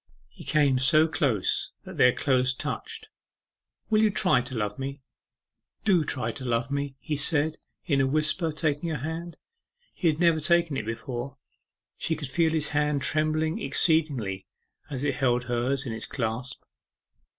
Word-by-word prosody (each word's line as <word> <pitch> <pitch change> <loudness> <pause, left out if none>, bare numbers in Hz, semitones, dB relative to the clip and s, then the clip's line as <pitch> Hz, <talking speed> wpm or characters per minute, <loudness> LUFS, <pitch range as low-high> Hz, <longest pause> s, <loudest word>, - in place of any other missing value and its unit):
He - - -13
came 140 -4 +3
so 155 +4 +5
close 130 - 0
that - - -10
their 125 - +6
clothes 130 0 +1
touched. 440 - -5 0.8
'Will 215 0 +4
you 220 - +5
try 180 -10 +3
to 130 +1 -6
love 105 0 -2
me? 135 0 -5 0.8
Do 185 -6 +4
try 120 -6 -1
to 130 - -7
love 120 +1 -1
me!' 140 -1 -2
he 150 - -3
said, 150 +2 +1 0.3
in 140 -4 +2
a 135 - +2
whisper, 155 +4 0
taking 155 +1 -1
her 155 - -1
hand. 165 +1 -6 0.6
He 175 - -1
had 155 -1 +2
never 170 -2 +4
taken 170 -1 +2
it 110 -5 -3
before. 120 +4 -5 0.6
She 160 - 0
could 145 -4 -5
feel 160 +4 +2
his 155 -2 0
hand 150 -1 0
trembling 155 +1 0
exceedingly 135 - +1 0.4
as 135 -2 -4
it 140 -3 0
held 125 -3 +2
hers 125 +3 -1
in 115 - -3
its 110 - -6
clasp. 125 0 -3
145 Hz, 160 wpm, -27 LUFS, 125-160 Hz, 0.8 s, their